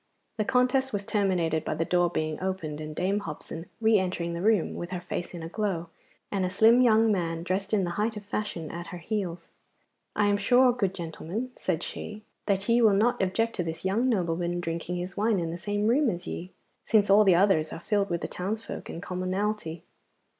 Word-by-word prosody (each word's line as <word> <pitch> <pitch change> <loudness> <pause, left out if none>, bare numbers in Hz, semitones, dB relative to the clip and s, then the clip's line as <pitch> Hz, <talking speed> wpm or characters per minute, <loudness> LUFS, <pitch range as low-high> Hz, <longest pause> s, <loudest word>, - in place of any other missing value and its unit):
The 215 - 0
contest 260 +1 +2
was 200 -1 -2
terminated 180 -7 +1
by - - -2
the 165 +1 0
door 175 0 +2
being 155 -1 -2
opened, 170 -5 -3
and 155 0 -6
Dame 195 +5 +1
Hobson 165 -1 -7
re 220 -2 +4
entering 180 -2 -2
the 170 - -4
room 210 -3 +2
with 175 - -5
her 180 - -3
face 175 0 -5
in 170 - -6
a - - -4
glow, 180 -3 -2 0.4
and 195 -2 0
a 180 - +1
slim 225 +6 +5
young 225 -2 +5
man 165 -4 -1
dressed 190 +3 -2
in 210 -3 +2
the 175 - -1
height 220 0 0
of 205 - -8
fashion 205 -6 -3
at 170 +1 -6
her 180 - -7
heels. 175 -2 -4 0.6
'I 210 - +3
am 205 0 +3
sure, 245 +4 +5
good 195 -6 -1
gentlemen,' 175 +8 -5
said 170 -3 -2
she, 215 0 -6 0.2
'that 195 -1 +1
ye 235 0 +4
will 220 -3 +6
not 230 +5 +2
object 225 +5 0
to 180 - 0
this 165 +2 -5
young 225 +7 +2
nobleman 175 -4 0
drinking 170 +1 -3
his 180 +2 -4
wine 210 -1 +2
in 165 -1 -2
the 170 - -4
same 205 +2 -1
room 260 +6 +3
with 180 -6 -2
ye, 180 +2 -6 0.3
since 210 -3 +3
all 210 +2 +8
the 190 -4 +5
others 170 -4 +3
are - - -6
filled 200 +2 0
with 170 -1 -1
the - - -2
townsfolk 215 +5 -5
and 170 - -6
commonalty. 185 -2 -2
190 Hz, 210 wpm, -28 LUFS, 170-215 Hz, 0.6 s, all